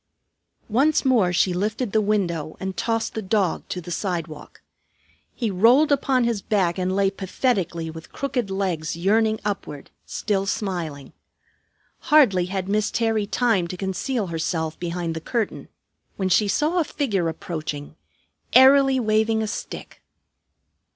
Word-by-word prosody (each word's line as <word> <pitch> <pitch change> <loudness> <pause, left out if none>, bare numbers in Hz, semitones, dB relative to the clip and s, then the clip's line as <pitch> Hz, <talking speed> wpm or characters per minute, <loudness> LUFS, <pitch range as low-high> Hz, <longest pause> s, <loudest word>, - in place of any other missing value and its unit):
Once 275 +7 +2
more 230 -9 +3
she 180 +1 +2
lifted 215 +5 -2
the 220 - +3
window 180 -7 -1
and 190 0 -4
tossed 225 +3 -1
the 220 - -3
dog 195 -3 0
to 180 - -3
the 175 0 -8
sidewalk. 170 -4 -5 0.7
He 230 -4 -1
rolled 240 +11 +5
upon 270 -2 +2
his 235 -4 0
back 190 -4 0
and 185 +1 0
lay 195 -1 +2
pathetically 185 -5 -1
with 160 0 -11
crooked 255 -6 -2
legs 175 -5 -2
yearning 215 +4 +2
upward, 170 -8 -5 0.2
still 195 -2 -1
smiling. 170 -9 -4 1.0
Hardly 230 -13 +5
had 190 0 -3
Miss 210 +1 +1
Terry 225 -3 0
time 220 -7 +1
to 180 - -6
conceal 195 +5 -2
herself 165 -1 -3
behind 170 -1 -3
the 160 - -5
curtain 230 +4 -3 0.5
when 190 -1 -1
she 195 +3 +3
saw 305 - +1
a - - +3
figure 200 - -1
approaching, 155 -3 -6 0.6
airily 270 0 +7
waving 220 -1 +1
a - - -2
stick. - - -7
195 Hz, 140 wpm, -23 LUFS, 175-225 Hz, 1.0 s, airily